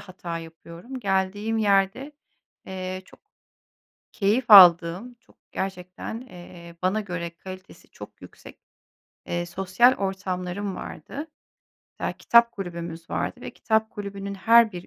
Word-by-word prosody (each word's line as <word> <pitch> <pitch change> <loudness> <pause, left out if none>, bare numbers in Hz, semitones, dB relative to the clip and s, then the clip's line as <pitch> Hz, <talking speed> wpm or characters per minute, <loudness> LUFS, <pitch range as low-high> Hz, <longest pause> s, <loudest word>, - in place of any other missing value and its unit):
hata 175 -3 -7
yapıyorum, 170 +9 -10
geldiğim 205 +1 -1
yerde, 205 +7 +1 0.5
eee, 185 0 -5
çok - - -20 0.9
keyif 215 +5 +1
aldığım, 180 +4 +8
çok - - -27
gerçekten, 190 +4 -5
eee, 175 -6 -13
bana 190 +4 +1
göre 180 -4 -5
kalitesi 185 +1 -12
çok - - -13
yüksek, - - -14 0.7
eee, 175 0 -2
sosyal 190 +8 +3
ortamlarım 190 0 -3
vardı. 295 +3 -8 0.7
Ya, - - -1
kitap 235 0 +4
kulübümüz 170 -3 -7
vardı - - -3
ve - - -7
kitap 220 0 0
kulübünün 200 -1 -6
her 230 +3 +5
bir 180 -1 -8
190 Hz, 115 wpm, -25 LUFS, 180-215 Hz, 0.9 s, aldığım